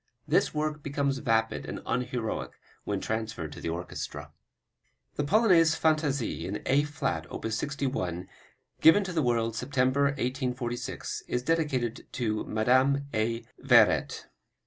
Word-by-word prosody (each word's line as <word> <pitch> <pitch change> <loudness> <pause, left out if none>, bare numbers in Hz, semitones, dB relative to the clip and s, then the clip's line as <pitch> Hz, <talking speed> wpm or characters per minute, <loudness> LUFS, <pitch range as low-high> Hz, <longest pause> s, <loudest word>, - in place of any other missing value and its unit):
This - - +3
work 150 0 -2
becomes 140 -1 -1
vapid 115 -2 +1
and - - -5
unheroic 125 -3 -2 0.3
when - - -1
transferred 110 -8 -3
to - - -9
the - - -3
orchestra. 85 +2 -5 0.8
The 145 - 0
Polonaise 170 -3 +4
Fantaisie 145 - 0
in 100 +2 -4
A 135 +2 +4
flat, 150 -1 -3
op. - - -6
61, 110 - -2 0.5
given 180 +6 +7
to 185 -2 -5
the 160 - +1
world 115 -3 +1
September, 135 +2 +1
1846, 125 -3 -2
is 125 - -1
dedicated 135 -7 -1
to 110 -4 -1
Madame 130 +6 +2
A. 115 +1 -1 0.2
Veyret. - - +4
130 Hz, 125 wpm, -28 LUFS, 115-145 Hz, 0.8 s, given